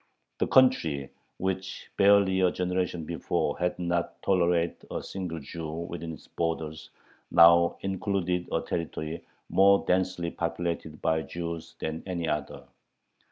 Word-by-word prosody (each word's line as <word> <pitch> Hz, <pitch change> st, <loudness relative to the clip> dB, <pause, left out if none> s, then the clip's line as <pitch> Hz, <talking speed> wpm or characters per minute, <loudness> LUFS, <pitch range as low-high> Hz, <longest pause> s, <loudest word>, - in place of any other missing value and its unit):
The -, -, +2 dB
country, 80 Hz, -, +3 dB, 0.3 s
which 95 Hz, 0 st, -4 dB
barely 100 Hz, -1 st, +5 dB
a 90 Hz, -1 st, +4 dB
generation 90 Hz, -2 st, -1 dB
before 85 Hz, -3 st, -1 dB
had 90 Hz, 0 st, 0 dB
not 85 Hz, -1 st, -2 dB
tolerated 85 Hz, -2 st, +1 dB
a -, -, -4 dB
single 90 Hz, -4 st, -5 dB
Jew 80 Hz, +3 st, -6 dB
within 85 Hz, +1 st, -5 dB
its -, -, -13 dB
borders, 80 Hz, -2 st, -3 dB, 0.4 s
now 85 Hz, 0 st, +6 dB
included 95 Hz, -2 st, -1 dB
a -, -, +1 dB
territory 80 Hz, -1 st, -4 dB, 0.2 s
more 100 Hz, +1 st, +5 dB
densely 90 Hz, -2 st, 0 dB
populated 85 Hz, -2 st, -3 dB
by 80 Hz, 0 st, +2 dB
Jews 85 Hz, 0 st, -6 dB
than 80 Hz, +1 st, -4 dB
any 85 Hz, -3 st, -2 dB
other. 75 Hz, -2 st, -3 dB
85 Hz, 125 wpm, -28 LUFS, 80-95 Hz, 0.4 s, now